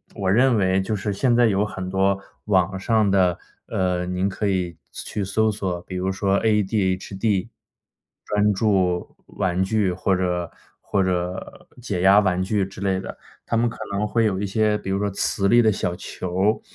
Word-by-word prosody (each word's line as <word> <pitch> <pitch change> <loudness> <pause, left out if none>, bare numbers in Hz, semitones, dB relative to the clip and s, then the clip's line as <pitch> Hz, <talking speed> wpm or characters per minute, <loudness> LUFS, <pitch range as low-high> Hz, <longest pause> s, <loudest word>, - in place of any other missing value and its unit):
我 95 -3 0
认 125 +4 +4
为 95 -1 +2
就 105 +3 -2
是 105 +1 -2
现 120 +4 +2
在 120 0 +5
有 100 -1 +1
很 95 -2 -6
多 95 +1 +2 0.3
网 95 -2 +1
上 110 0 +2
的 90 -3 +3 0.3
呃， 90 -1 -1
您 90 +2 -1
可 105 +2 -2
以 90 -3 -1 0.2
去 - - -8 0.2
去 - - -1
搜 110 +3 +1
索， 95 -4 -3
比 95 - -9
如 95 +1 -1
说 100 0 +1
ADHD、 100 -1 0 0.8
专 105 0 +2
注 95 -4 0
玩 90 0 -1
具 100 -1 +1
或 95 +2 0
者 90 -2 -1 0.3
或 100 -2 0
者 90 0 -3
解 100 -7 -3
压 95 +2 +7
玩 95 -3 +1
具 100 +1 0
之 95 - -11
类 95 -1 0
的， - - -8 0.3
他 115 - 0
们 120 +1 +2
可 - - -10
能 100 +2 -1
会 115 +2 +1
有 95 -3 0
一 105 - -1
些 105 +1 +1
比 105 - -7
如 95 0 0
说 100 0 0
磁 100 0 0
力 120 +2 +6
的 110 -2 +4
小 90 -3 -2
球， 95 +3 -1
95 Hz, 210 characters per minute, -23 LUFS, 95-105 Hz, 0.8 s, 压